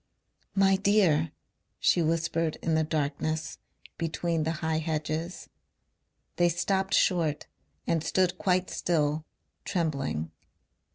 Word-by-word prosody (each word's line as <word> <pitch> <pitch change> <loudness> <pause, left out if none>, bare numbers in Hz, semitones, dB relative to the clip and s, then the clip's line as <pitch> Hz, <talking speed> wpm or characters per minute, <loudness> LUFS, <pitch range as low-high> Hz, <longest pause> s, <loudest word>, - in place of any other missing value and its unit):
"My 195 -1 +4
dear," 190 -7 +3 0.5
she 175 - +3
whispered 165 0 0
in 165 - +1
the 160 0 +3
darkness 155 +1 -2 0.4
between 165 -1 -1
the 160 - 0
high 160 0 +1
hedges. 160 +2 -3 0.9
They 175 0 +4
stopped 190 +3 0
short 165 -5 +2 0.4
and 165 -2 +1
stood 185 0 +1
quite 185 -1 +1
still, 155 -2 0 0.4
trembling. 140 - -2
165 Hz, 105 wpm, -28 LUFS, 155-180 Hz, 0.9 s, My